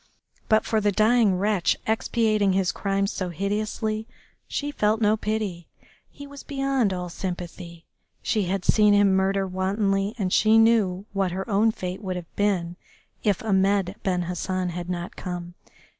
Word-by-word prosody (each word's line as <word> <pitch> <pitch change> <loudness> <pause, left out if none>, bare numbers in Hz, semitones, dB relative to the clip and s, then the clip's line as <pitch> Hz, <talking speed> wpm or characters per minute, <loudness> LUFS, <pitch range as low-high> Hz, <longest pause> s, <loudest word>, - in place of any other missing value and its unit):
But 220 -1 +4
for 220 -1 +1
the 205 0 +2
dying 215 -1 +3
wretch 200 -2 +1
expiating 215 -2 +1
his 190 -1 +1
crimes 195 0 -1
so 185 -2 -3
hideously 215 +4 -2 0.4
she 290 0 -3
felt 215 -4 +1
no 215 -1 +3
pity, 210 -5 -3 0.4
he 285 - -11
was 280 0 -10
beyond 270 -6 0
all 180 -1 -3
sympathy. 175 -1 -7 0.4
She 215 -3 0
had 185 +1 -2
seen 210 -1 +5
him 205 -1 +4
murder 195 +1 +1
wantonly, 195 +2 0
and 190 -4 -1
she 220 +1 +5
knew 215 -4 +3
what 195 -3 0
her 190 +1 -4
own 215 +1 +3
fate 185 -2 -5
would 185 -3 -3
have 175 -2 -8
been 180 -4 0 0.5
if 205 -2 +1
Ahmed 195 -2 +2
Ben 180 -3 0
Hassan 180 +1 -2
had 175 0 -6
not 175 -1 -4
come. 175 -1 -6
195 Hz, 160 wpm, -25 LUFS, 185-215 Hz, 0.5 s, seen